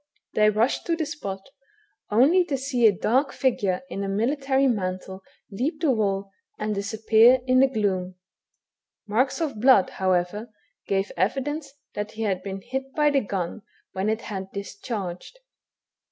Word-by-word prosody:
They 215 0 +4
rushed 220 +5 0
to 335 - +2
the 325 -1 -2
spot, 200 -10 -6 0.6
only 280 - +5
to 285 -5 -2
see 255 -3 +2
a - - +6
dark 260 - +1
figure 205 -7 0
in 200 -6 -4
a 195 - -3
military 270 +6 +1
mantle 190 -5 -2 0.3
leap 275 +10 -2
the 315 -4 +2
wall, 200 -4 -1 0.3
and 215 0 -2
disappear 220 +4 +4
in 255 0 +4
the 270 - +6
gloom. 190 -7 -1 0.9
Marks 250 +8 +1
of 275 -10 -2
blood, 250 -7 +5
however, 185 +4 0 0.4
gave 195 0 0
evidence 270 - -1 0.2
that 210 +1 -4
he 225 - -4
had 190 -4 0
been 195 0 -6
hit 265 +4 -5
by 300 -1 +3
the 275 -1 +3
gun 195 -1 -4 0.3
when 190 +3 -1
it 220 +1 -1
had 195 -2 -6
discharged. 200 - -6
220 Hz, 155 wpm, -25 LUFS, 195-265 Hz, 0.9 s, a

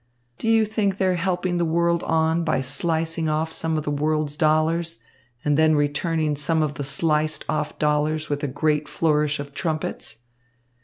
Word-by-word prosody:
Do 225 - -1
you 225 -1 +4
think 205 -3 -1
they're 190 -2 +2
helping 180 0 -1
the - - +2
world 170 +1 +1
on 160 +1 +1
by 155 -4 +1
slicing 160 +4 -1
off 155 +1 -1
some 160 0 -1
of 155 - -2
the 150 - -2
world's 150 0 0
dollars 160 +2 +1 0.4
and 145 -1 +2
then 155 0 +5
returning 150 +1 0
some 155 +2 +1
of 150 -1 -1
the 145 - -5
sliced 155 +1 0
off 150 0 -2
dollars 150 +1 0
with 145 0 -3
a - - +1
great 150 +2 0
flourish 150 -2 +1
of 145 0 -7
trumpets? 155 -8 -4
155 Hz, 170 wpm, -23 LUFS, 150-165 Hz, 0.4 s, then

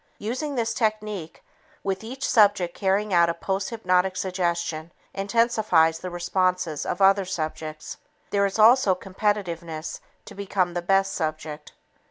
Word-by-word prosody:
Using 260 +7 -3
this 225 -2 0
technique, 215 -7 -3 0.4
with 195 +1 -2
each 260 +5 -4
subject 205 -6 +4
carrying 200 +1 0
out 170 -1 +5
a 170 - -1
posthypnotic 190 -1 0
suggestion, 170 -3 -2 0.2
intensifies 195 -6 +2
the 185 - -5
responses 180 -3 -1
of 195 - 0
other 195 +1 +5
subjects. 155 -3 -5 0.3
There 200 -1 +3
is 195 - -5
also 220 -3 +6
competitiveness 180 -5 -3 0.3
to 210 - -11
become 190 -3 -1
the 175 - -2
best 195 +2 +2
subject. 155 -2 -4
190 Hz, 130 wpm, -25 LUFS, 170-205 Hz, 0.4 s, also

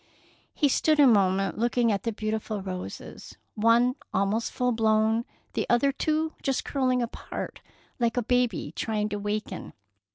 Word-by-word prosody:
He 295 - +3
stood 305 +3 +2
a 290 - +8
moment 195 -4 +3
looking 240 0 +2
at 200 -2 0
the 230 - -2
beautiful 215 -1 -3
roses, 185 -1 -7 0.2
one 230 +3 +4 0.2
almost 205 +4 0
full 250 0 0
blown, 220 0 +2 0.3
the - - -1
other 240 +4 +4
two 310 +3 -1
just 270 -2 -1
curling 255 -3 +1
apart, 235 - -6 0.4
like 235 0 +1
a 245 - +2
baby 240 -10 0
trying 215 -2 -1
to 205 - -3
waken. 210 +1 -4
230 Hz, 150 wpm, -27 LUFS, 210-250 Hz, 0.4 s, a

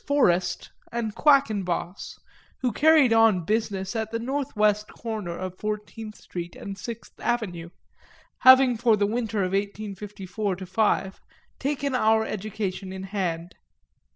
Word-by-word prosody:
Forest 185 -12 +2 0.2
and 230 -2 -2
Quackenboss, 205 - +1 0.4
who 250 -2 +1
carried 295 0 +5
on 225 -6 +4
business 205 -2 -1
at 220 -1 -2
the 230 - -2
northwest 215 -5 0
corner 215 -8 -5
of 185 0 -6
Fourteenth 215 +1 -5
Street 175 -1 -7
and 200 - -7
Sixth 230 +3 -8
Avenue, 200 -8 -2 0.7
having 260 -2 +7
for 225 -1 +3
the 205 - +2
winter 220 -1 -1
of 185 - -1
1854 200 0 -3
5 190 0 0 0.4
taken 280 0 -1
our 220 -2 +3
education 200 -2 -4
in 190 0 -6
hand. 180 -4 -3
210 Hz, 125 wpm, -25 LUFS, 190-230 Hz, 0.7 s, having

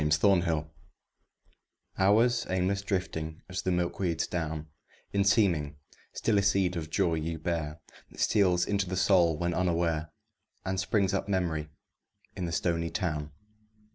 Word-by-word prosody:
SUMMER 85 +4 +4
HOURS 80 -2 +1 1.4
Hours 115 +5 +4
aimless 95 +2 0
drifting 90 -5 -3
as 95 - -4
the 95 - -1
milkweed's 85 -1 0
down 80 -3 -3 0.5
In 100 0 +3
seeming, 90 -8 +2 0.3
still 105 -3 +1
a - - +3
seed 95 -2 +2
of 80 -2 -4
joy 85 +1 +1
ye 80 +1 -2
bear 80 -1 -3 0.3
That - - -15
steals 90 -4 +3
into 100 -2 -1
the 95 - -2
soul 85 -5 +4
when 85 +2 -1
unaware, 85 -3 0 0.5
And 95 0 -1
springs 95 0 +1
up 100 +1 -1
Memory 85 -5 -1 0.7
in 90 - -3
the 85 - -3
stony 85 0 0
town. 75 -7 -2
90 Hz, 140 wpm, -29 LUFS, 80-95 Hz, 1.4 s, SUMMER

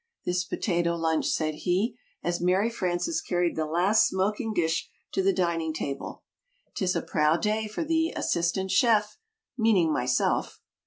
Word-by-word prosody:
this 180 0 0
Potato 175 -2 -1
Lunch," 160 -1 0
said 155 -1 0
he, 185 +9 0 0.3
as 175 0 -1
Mary 190 +6 +2
Frances 175 -5 -1
carried 175 -1 0
the 155 -1 -1
last 185 +7 +3
smoking 210 +4 -1
dish 165 -5 0 0.2
to 195 - 0
the 195 +1 +3
dining 170 -4 -1
table. 140 -3 -5 0.5
"'Tis 185 -3 0
a 170 - -1
proud 155 +3 +1
day 215 0 0
for 215 +10 -3
the 325 +1 +1
'Assistant 175 +3 0
Chef' 220 - +3 0.4
meaning 195 -8 +3
myself." 125 -2 0
180 Hz, 150 wpm, -27 LUFS, 165-210 Hz, 0.5 s, last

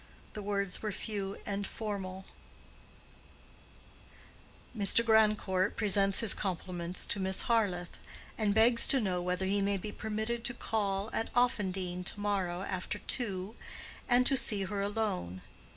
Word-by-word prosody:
The 210 - -6
words 200 -2 -2
were 215 - -2
few 200 -1 -4
and 200 -1 -3
formal: 190 -3 -5 2.5
Mr. 215 +2 +3
Grandcourt 210 -4 +3
presents 200 -2 +4
his 225 -4 +3
compliments 180 -2 -3
to 205 - -1
Miss 190 0 +1
Harleth, 195 -7 0 0.4
and 210 -2 0
begs 230 +2 +6
to 270 - +4
know 185 -6 -1
whether 180 +1 -1
he 200 +1 +1
may 200 0 +1
be 210 +3 -6
permitted 220 +2 -3
to 245 0 -2
call 205 -2 -1
at 225 - -2
Offendene 190 -7 0
to 205 - -4
morrow 190 -3 -1
after 185 +1 -3
two 205 -2 -3 0.5
and 245 0 +5
to 275 - +6
see 210 -5 +3
her 200 +1 -3
alone. 200 - -2
200 Hz, 135 wpm, -32 LUFS, 190-220 Hz, 2.5 s, begs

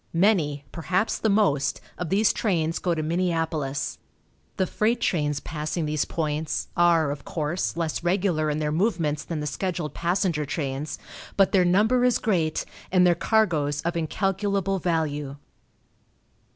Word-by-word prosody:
Many 160 -8 +2
perhaps 180 +6 -1
the 220 - +1
most 195 -10 +2 0.2
of 175 -3 -4
these 205 +4 +3
trains 165 -6 0
go 175 -2 0
to 155 - -2
Minneapolis. 160 -4 -1 0.6
The 190 - +2
freight 225 +6 0
trains 150 -9 0
passing 155 +2 -3
these 150 -1 0
points 155 -1 -2
are, 170 -4 +4
of 145 - -6
course, 165 +2 -2
less 165 -1 -2
regular 175 -4 +1
in 150 - -1
their 150 -1 -1
movements 160 -4 0
than 160 -3 -4
the - - -3
scheduled 165 0 -3
passenger 175 -2 0
trains, 145 0 -3 0.4
but 195 -1 +4
their 185 -2 +4
number 215 +8 +3
is 250 -1 +4
great, 165 -7 0 0.3
and 180 -1 +5
their 175 - +5
cargoes 160 -7 +1
of 170 +1 -1
incalculable 195 +3 0
value. 150 -5 -1
170 Hz, 145 wpm, -25 LUFS, 150-190 Hz, 0.6 s, and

